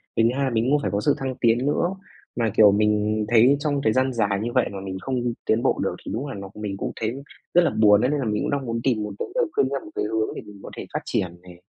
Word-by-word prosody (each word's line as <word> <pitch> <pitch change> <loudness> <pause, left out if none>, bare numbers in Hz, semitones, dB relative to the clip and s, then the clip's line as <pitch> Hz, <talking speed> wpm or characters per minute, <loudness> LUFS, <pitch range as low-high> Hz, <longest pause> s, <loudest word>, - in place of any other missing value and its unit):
Cái 115 - +3
thứ 115 - +4
hai 135 - +1
mình 115 +2 +1
muốn 145 +1 +3
phải - - -2
có 100 - 0
sự 145 - +4
thăng 130 -1 -3
tiến 115 -1 +3
nữa. 150 +4 +1 0.5
Mà, 115 -2 +1
kiểu, 105 -2 +8
mình 105 +1 +1
thấy 120 +4 +5
trong 145 -2 -1
thời 110 - +3
gian 130 0 +1
dài 105 -4 0
như 120 - -2
vậy 125 - +2
mà 100 - -6
mình 95 -1 -5
không 130 - -3 0.3
tiến 110 +2 +2
bộ - - +1
được - - -1
thì - - -5
đúng 130 +6 -3
là 135 - -6
nó 100 -1 -7
mình 105 -2 -5
cũng - - -3
thấy 120 +5 -4 0.3
rất 175 - +6
là 170 - +3
buồn 105 -1 +6
ấy, 125 - +2
nên 150 - 0
là 135 - -2
mình 105 -1 -1
cũng - - -1
đang 140 -2 -1
muốn 115 -1 -2
tìm 115 -5 +1
một 105 - -5
cái - - -3
lời - - +3
khuyên 130 - +3
theo 140 0 -2
một 105 - -11
cái - - -1
hướng 110 0 -1
để - - -5
mình 100 -1 -13
có - - -8
thể - - -5
phát - - 0
triển 85 -1 -2
này. 90 -1 -15
115 Hz, 305 wpm, -24 LUFS, 105-130 Hz, 0.5 s, kiểu